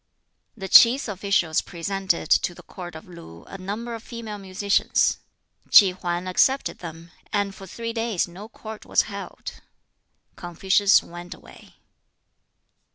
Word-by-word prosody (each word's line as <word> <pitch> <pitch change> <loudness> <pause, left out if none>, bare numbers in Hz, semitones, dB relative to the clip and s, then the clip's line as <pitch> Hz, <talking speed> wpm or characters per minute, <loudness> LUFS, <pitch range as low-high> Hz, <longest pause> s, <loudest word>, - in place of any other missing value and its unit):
The 195 -2 -6
Ts'i 235 +7 +8
officials 190 -5 0
presented 185 -1 -2
to 175 - +3
the - - -14
Court 175 -3 -9
of 160 - -11
Lu 165 - -12
a 195 - -10
number 215 +6 -5
of 225 - -6
female 225 -3 -8
musicians. 195 +1 +1 0.5
Ki 195 -4 +8
Hwan 180 0 -4
accepted 265 +9 +1
them, 165 0 -10 0.2
and 200 -1 -1
for 195 0 -12
three 230 +5 -5
days 225 -6 -1
no 190 +5 -11
Court 220 -2 -10
was - - +2
held. - - -8 0.7
Confucius 190 +4 +2
went 175 +1 -9
away. - - -17
195 Hz, 135 wpm, -24 LUFS, 175-215 Hz, 0.7 s, Ts'i